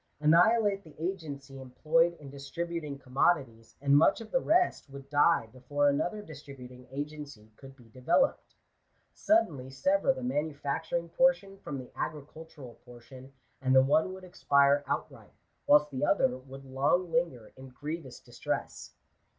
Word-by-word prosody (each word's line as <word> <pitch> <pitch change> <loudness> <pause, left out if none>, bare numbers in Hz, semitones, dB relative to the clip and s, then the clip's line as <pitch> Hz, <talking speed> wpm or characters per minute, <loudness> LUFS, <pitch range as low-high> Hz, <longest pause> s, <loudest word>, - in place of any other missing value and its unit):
Annihilate 195 +6 +4
the 155 -2 -17
agency 145 -6 -5
em 130 -1 -10
ployed 165 +6 +2
in 140 -2 -12
distributing 150 +2 -5
commodities! 130 -3 -1
and 140 0 +3
much 150 - +4
of 225 -1 -10
the 260 - +2
rest 350 - +1
would 140 0 -12
die 145 -2 +3
before 145 +3 0
another 175 +9 -1
distributing 125 -6 -12
agency 145 -5 -8
could 135 +2 -14
be 120 -4 -19
developed. 130 - 0 0.6
Suddenly 155 - +1
sever 280 - +1
the 260 -1 -5
manufacturing 155 - -2
portion 200 -4 +1
from 140 - -6
the 130 -2 -9
agricultural 150 -3 -8
portion, 125 +2 -14 0.3
and 130 0 +2
the 130 - +7
one 155 +6 +2
would 190 0 -11
expire 140 -5 +2
outright, - - -5 0.3
whilst 150 0 +5
the 130 0 -4
other 130 -6 +2
would 135 +1 -12
long 140 +7 0
linger 160 -9 -2
in 130 0 -12
grievous 145 0 -7
distress. - - -5
145 Hz, 140 wpm, -29 LUFS, 135-170 Hz, 0.6 s, the